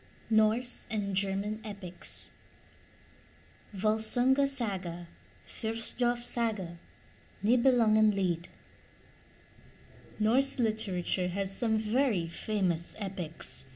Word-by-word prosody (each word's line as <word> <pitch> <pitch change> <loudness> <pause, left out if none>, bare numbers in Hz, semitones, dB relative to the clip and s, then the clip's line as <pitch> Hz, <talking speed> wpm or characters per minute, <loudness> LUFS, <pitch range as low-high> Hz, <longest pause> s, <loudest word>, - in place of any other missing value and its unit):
*NORSE 220 +3 +2
AND 200 -3 -2
GERMAN 200 +2 -1
EPICS 200 -4 -5 1.4
VOLSUNGA 220 +7 +2
SAGA, 190 -10 -2 0.4
FRITHJOF 240 +2 -2
SAGA, 210 -9 -2 0.6
NIBELUNGENLIED 215 -7 +3 1.7
Norse 250 +6 +2
literature 200 -6 0
has 195 +1 0
some 220 -1 +2
very 215 -4 +1
famous 175 -2 0
epics. 180 -9 -2
215 Hz, 70 wpm, -30 LUFS, 190-235 Hz, 1.7 s, NIBELUNGENLIED